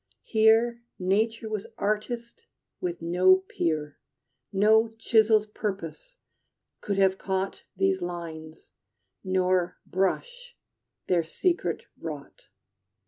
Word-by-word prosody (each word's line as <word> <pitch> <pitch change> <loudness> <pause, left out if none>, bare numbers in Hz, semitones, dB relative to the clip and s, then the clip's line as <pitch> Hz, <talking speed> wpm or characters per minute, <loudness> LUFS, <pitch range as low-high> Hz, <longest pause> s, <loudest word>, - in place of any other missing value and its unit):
Here 225 +2 +3 0.2
Nature 220 +5 0
was 215 -2 -4
artist 235 +3 -3 0.3
with 170 -2 -4
no 180 +2 +5
peer. 160 -5 -2 0.5
No 220 +3 +4
chisel's 220 -1 +4
purpose 210 - -5 0.6
could 200 -1 -2
have 190 -1 +3
caught 190 0 -3
These 190 0 +1
lines, 165 -2 -7 0.5
nor 185 -1 +1
brush 485 - -2 0.5
their 175 -2 +2
secret 345 - -1
wrought. - - -8
195 Hz, 90 wpm, -27 LUFS, 180-225 Hz, 0.6 s, no